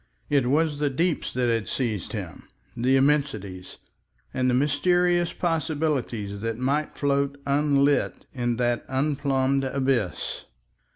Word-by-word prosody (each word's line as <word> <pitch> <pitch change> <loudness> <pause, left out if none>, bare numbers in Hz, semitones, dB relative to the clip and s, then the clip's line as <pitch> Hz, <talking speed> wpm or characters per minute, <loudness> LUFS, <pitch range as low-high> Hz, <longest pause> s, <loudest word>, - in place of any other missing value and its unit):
It 140 -4 +3
was 150 +2 +1
the 145 -1 +1
deeps 165 +5 -1
that 125 -1 +1
had 115 -2 0
seized 110 -8 -2
him, - - -7 0.3
the 125 +3 +2
immensities, 130 -10 0 0.6
and 130 0 +1
the 125 - +2
mysterious 175 +5 +2
possibilities 145 - -1
that 115 0 -2
might 140 +4 -1
float 140 0 0
unlit 140 0 +2
in 120 -2 -1
that 120 0 0
unplumbed 135 -1 +1
abyss. 130 -7 -1
135 Hz, 120 wpm, -25 LUFS, 120-145 Hz, 0.6 s, It